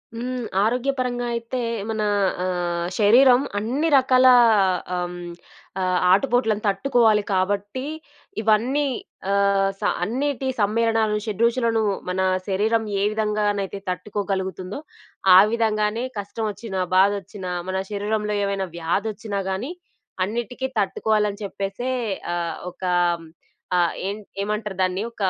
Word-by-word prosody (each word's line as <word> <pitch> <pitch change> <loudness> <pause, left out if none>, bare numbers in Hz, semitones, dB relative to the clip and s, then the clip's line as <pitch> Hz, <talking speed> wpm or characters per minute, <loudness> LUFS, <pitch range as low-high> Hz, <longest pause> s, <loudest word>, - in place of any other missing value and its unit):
హ్మ్. 250 +1 -3 0.2
ఆరోగ్యపరంగా 250 +1 0
అయితే, 235 +2 -4 0.3
మనా 215 -1 -1 0.4
ఆహ్, 175 -2 -1
శరీరం 245 +4 +6 0.2
అన్ని 255 +9 -1
రకాలా 255 -1 +5 0.6
ఆహ్, 180 0 -1
హ్మ్, 175 -1 -7 0.5
ఆహ్, 185 -1 +1
ఆటుపోట్లను 225 0 +2
తట్టుకోవాలి 215 +1 +3
కాబట్టి, 200 +5 -1 0.6
ఇవన్నీ 235 +7 +2 0.5
ఆహ్, 200 -1 +3
స - - -28 0.2
అన్నీటి 265 +3 -1
సమ్మేళనాలు, 220 +1 +2
షెడ్రుచులను 230 +1 +1 0.3
మనా 190 +1 +1 0.2
శరీరం 215 +4 +1 0.2
ఏ - - +2
విధంగానైతే 210 -2 -1
తట్టుకోగలుగుతుందో, 190 - -3 0.6
ఆ - - +11
విధంగానే 220 0 0 0.2
కష్టమొచ్చినా, 205 0 -4 0.2
బాధొచ్చినా 195 -1 +1 0.2
మన 190 - -1
శరీరంలో 210 +1 -1
ఏవైనా 200 -1 -1
వ్యాధొచ్చినా 200 +4 -2
గానీ, 200 - -3 0.5
అన్నిటికి 240 +5 -3
తట్టుకోవాలని 210 +1 0
చెప్పేసే 200 +5 -4 0.4
ఆహ్, 170 -2 -2 0.2
ఒకా 180 0 -2 0.8
ఆహ్, 175 -1 +3
హ్మ్, - - -9
ఏన్ 210 +1 -6 0.2
ఏమంటరు 210 -1 -3
దాన్నీ 185 +2 -1
ఒకా 200 -4 -1
210 Hz, 105 wpm, -23 LUFS, 195-230 Hz, 0.8 s, ఆ